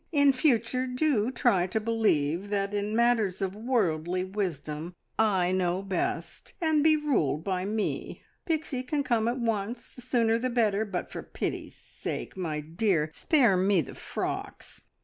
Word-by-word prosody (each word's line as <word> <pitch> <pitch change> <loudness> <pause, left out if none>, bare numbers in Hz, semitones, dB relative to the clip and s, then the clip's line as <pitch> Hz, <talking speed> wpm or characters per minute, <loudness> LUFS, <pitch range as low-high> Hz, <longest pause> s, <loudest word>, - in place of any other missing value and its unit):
In 285 -3 +5
future 255 -1 +1
do 250 -3 +1
try 235 -8 +2
to 205 +4 -1
believe 205 -6 +1
that 200 0 -1
in 205 +1 -1
matters 230 -5 +2
of 195 0 -2
worldly 185 -7 0
wisdom 175 -4 -4 0.2
I 190 -5 +3
know 185 0 0
best, 195 -3 -3
and 315 -4 +2
be 315 0 +6
ruled 240 - 0
by 185 -1 -1
me! 215 +1 -3 0.2
"Pixie 310 -6 -1
can 285 +3 -1
come 235 -4 +1
at 240 +2 0
once 230 0 -2
the 250 - -11
sooner 230 -2 +2
the 255 +2 -1
better, 220 -3 +2
but 185 -4 -4
for - - -5
pity's - - -4
sake, - - -6
my 160 -5 -3
dear, 160 0 0
spare 245 - +3
me 190 +1 +3
the 135 - -8
frocks. - - -5
210 Hz, 155 wpm, -28 LUFS, 185-245 Hz, 0.2 s, be